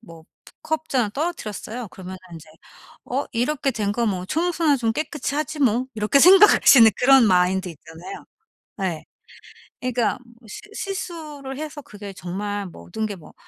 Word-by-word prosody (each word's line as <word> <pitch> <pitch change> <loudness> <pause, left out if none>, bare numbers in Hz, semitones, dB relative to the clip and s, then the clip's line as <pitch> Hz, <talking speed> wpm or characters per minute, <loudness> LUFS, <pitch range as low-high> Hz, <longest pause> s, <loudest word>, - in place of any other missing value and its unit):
뭐 165 -7 -14 0.4
컵 315 0 -2
잔을 245 -6 0
떨어뜨렸어요. 245 - -5
그러면은 185 0 -9
인제 160 -1 -11 0.6
'어 270 +3 -2
이렇게 270 +4 0
된 210 -4 -2
거 235 +1 -1
뭐 185 -3 -2
청소나 330 - +1
좀 225 -3 0
깨끗이 295 0 -3
하지 310 +1 -3
뭐.' 250 -1 +2
이렇게 215 +5 +2
생각할 385 +5 +8
수 270 - +8
있는 225 -1 +8
그런 265 -1 +6
마인드 185 0 +2
있잖아요. 165 - -11 0.6
예. 170 -5 -3 0.8
그러니까 250 -2 -1 0.3
실 415 - -11
실수를 310 -9 -6
해서 300 -1 -6
그게 205 -4 -10
정말 200 +3 -4
모든 85 - -6
게 205 -2 -4
뭐 165 - -15
235 Hz, 310 characters per minute, -22 LUFS, 200-300 Hz, 0.8 s, 생각할